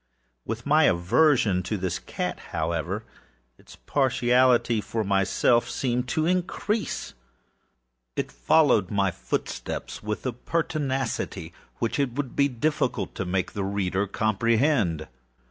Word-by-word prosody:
With 115 +2 -4
my 155 +2 +5
aversion 105 - +3
to 105 +4 -3
this 90 -1 -2
cat, 90 -1 -4
however, 80 -1 -2 0.6
its - - -15
partiality 125 -3 +2
for 110 +1 -2
myself 100 +4 +2
seemed 125 -1 -1
to 155 +4 0
increase. 185 +4 -1 1.0
It - - -2
followed 100 - +3
my 100 -2 +1
footsteps - - -4
with 105 +3 -4
a 130 - -1
pertinacity 135 - -2 0.2
which 115 +4 -1
it 135 -4 0
would 135 -1 -4
be 140 - +4
difficult 145 +4 -1
to 95 - -3
make 90 0 -1
the 100 - -3
reader 100 0 -1
comprehend. 110 - +1
115 Hz, 120 wpm, -26 LUFS, 95-135 Hz, 1.0 s, my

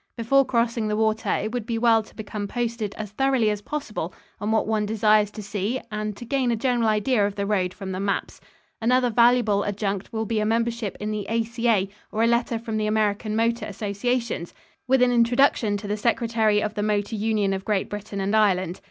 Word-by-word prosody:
Before 275 +4 +4
crossing 235 -3 0
the 210 0 -1
water, 220 0 0
it 215 - -1
would 240 -2 -4
be 230 -2 -1
well 225 -1 +4
to 215 - -17
become 210 -1 -5
posted 230 -2 -3
as 210 -2 -6
thoroughly 260 -2 +2
as 210 -1 -3
possible 210 - -5 0.2
on 205 - -2
what 220 - +2
one 215 -1 0
desires 210 0 +3
to 210 0 -8
see 205 +5 -2
and 210 -1 -3
to 240 - -8
gain 260 0 0
a 235 - +2
general 240 -1 +1
idea 215 +1 +2
of 200 0 -1
the 200 - -2
road 190 -3 0
from 190 0 -7
the 185 - -3
maps. 200 0 -2 0.4
Another 250 +1 +3
valuable 235 -3 +4
adjunct 200 -1 -3
will 220 0 -2
be 220 0 -1
a - - +1
membership 230 -1 -1
in 210 +1 -3
the 210 -2 -3
A.C.A. 230 -3 +1 0.2
or 220 - 0
a - - +4
letter 235 0 +1
from 225 -1 -4
the 215 0 0
American 215 0 0
motor 230 0 0
associations, 210 -1 -2 0.3
with 260 0 +4
an 250 - +4
introduction 235 -3 +3
to 205 - -7
the 205 - -1
Secretary 225 -1 +1
of 210 - -2
the 205 - -3
Motor 210 +1 0
Union 210 -2 +1
of 190 0 -3
Great 205 -2 0
Britain 205 -1 -6
and 195 +2 0
Ireland. 185 -4 +2
215 Hz, 210 wpm, -24 LUFS, 205-235 Hz, 0.4 s, Before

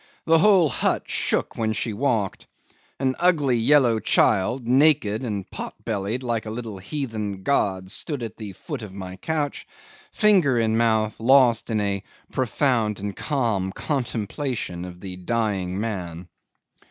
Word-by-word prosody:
The 165 0 +5
whole 195 -3 +5
hut - - 0
shook - - 0
when 110 -1 0
she 110 0 -2
walked. 110 -4 -1 0.5
An 130 -1 +1
ugly 150 -8 +3
yellow 120 -1 +4
child, 110 +3 +2
naked 130 -5 +3
and 105 -6 -3
pot - - -6
bellied 110 +3 -2
like 115 -3 -2
a - - -3
little 110 -3 -6
heathen 105 -4 -4
god, 95 -8 0
stood 140 +2 -2
at 110 -1 -6
the 105 -3 -7
foot 140 - -7
of 100 -3 -9
the 95 -1 -7
couch, 150 -3 -2 0.4
finger 185 - +3
in 110 -1 +2
mouth, 110 -2 +1
lost 125 -1 +4
in 110 -2 0
a 100 -1 -1 0.3
profound 120 -4 0
and 100 -1 -4
calm 115 -10 -1
contemplation 120 - -3
of 90 -1 -10
the 95 -2 -7
dying 95 -2 -1
man. 90 -6 -4
115 Hz, 145 wpm, -24 LUFS, 100-135 Hz, 0.5 s, The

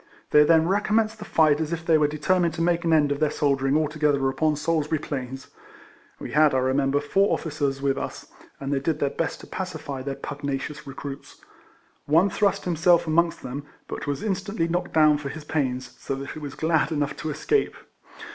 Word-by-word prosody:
They 150 - +7
then 160 +1 +4
recommenced 215 +3 +1
the 210 - -7
fight 155 -4 +3
as 160 0 -2
if 165 -1 -4
they 165 - +4
were 150 -1 +4
determined 170 +3 +1
to 165 - -3
make 170 0 +1
an 165 - +1
end 150 -2 +4
of 145 - -1
their 155 -1 +2
soldiering 140 -1 +1
altogether 150 -3 +1
upon 155 +3 +1
Salisbury 155 0 0
Plains. 135 -3 -6 0.7
We - - -7
had, 150 -2 +4
I - - +4
remem 130 +1 +1
ber, 140 +1 +2
four 195 +8 +2
officers 140 -3 -2
with 135 -1 +1
us, - - -6 0.3
and 140 +1 -3
they 140 - +1
did 150 +3 -1
their 140 -2 0
best 165 - -3
to - - -10
pacify 155 -7 -5
their 135 +1 -4
pugnacious 140 +1 -5
recruits. 140 0 -8 0.7
One 165 +7 +4
thrust 200 0 +1
himself 170 0 +3
amongst 170 +1 +1
them, 135 +3 -5 0.2
but - - -6
was 145 0 -2
instantly 195 -3 -1
knocked 175 +2 -2
down 155 -2 +5
for 140 -2 -5
his 155 +2 -8
pains, 130 -4 -2
so 135 - -3
that 135 +1 -6
he - - -7
was 145 -3 -7
glad 160 0 +1
enough 145 -2 -1
to 155 - -4
escape. 405 - 0
150 Hz, 200 wpm, -25 LUFS, 140-165 Hz, 0.7 s, They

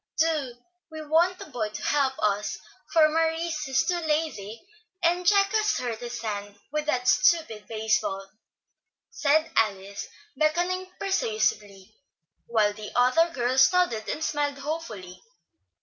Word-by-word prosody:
Do, 305 -6 0 0.4
we 315 -1 -7
want 340 +4 +2
a - - -6
boy 225 -4 -2
to 210 - -8
help 275 -2 +1
us, 210 0 0 0.3
for 315 -2 +6
Maurice 325 0 -1
is 265 0 +1
too 355 -1 0
lazy, 305 - -3 0.4
and 350 +1 +2
Jack 395 0 +4
has 430 -1 +1
hurt 240 -3 -3
his 240 0 -6
hand 205 -2 -4 0.2
with 300 0 -2
that 250 -4 0
stupid 255 -8 +2
base 220 -1 +1
ball," 195 0 -4 0.8
said 315 -6 +2
Alice, 200 -2 -1 0.3
beckoning 355 +4 0
persuasively, 215 - -1 0.5
while 215 -3 +2
the 210 0 -8
other 255 +8 +4
girls 260 -3 +3
nodded 355 -13 +1
and 315 - -3
smiled 290 -2 -1
hopefully. 230 - -6
280 Hz, 135 wpm, -26 LUFS, 215-325 Hz, 0.8 s, for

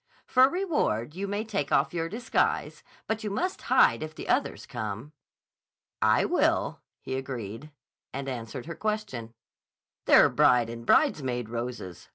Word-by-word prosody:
For 260 +1 +5
reward 295 - -1
you 195 +3 -4
may 205 +2 -2
take 200 -10 -3
off 140 - +2
your 165 -1 -2
disguise, 230 +6 -1 0.2
but 220 0 -2
you 210 - -2
must 360 - -2
hide - - +4
if 155 0 -6
the - - -8
others - - 0
come." 110 +6 -5 0.9
"I - - +4
will," - - +1 0.2
he - - -5
agreed, 130 0 -6 0.4
and 135 +1 -5
answered 120 -2 -5
her 165 - -5
question: 205 - -3 0.7
"They're - - +7
bride 120 -2 +4
and 115 0 -9
bridesmaid 125 -5 +2
roses. 115 -6 -6
140 Hz, 145 wpm, -28 LUFS, -, 0.9 s, They're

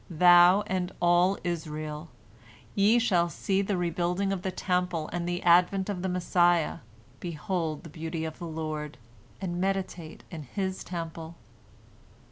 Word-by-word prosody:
Thou 175 +3 +6
and 185 -2 -2
all 175 +2 +3
Israel, 155 -2 -4 0.6
ye 210 +4 +4
shall 180 -8 +2
see 190 +5 0
the 200 -1 -1
rebuilding 180 +3 0
of 190 - -3
the 190 - -2
Temple 180 -3 -1
and 175 0 -2
the 175 0 -3
advent 180 +3 +4
of 190 -3 -3
the 190 - -1
Messiah, 175 -2 +2 0.4
behold 165 -2 -3
the 165 - -10
beauty 160 +1 -4
of 160 -1 -7
the 170 - -5
Lord, 155 -2 -5 0.4
and 175 -2 -3
meditate 190 -4 -3
in 165 -3 -6
His 190 +7 -4
Temple." 165 -1 -6
175 Hz, 140 wpm, -28 LUFS, 165-185 Hz, 0.6 s, Thou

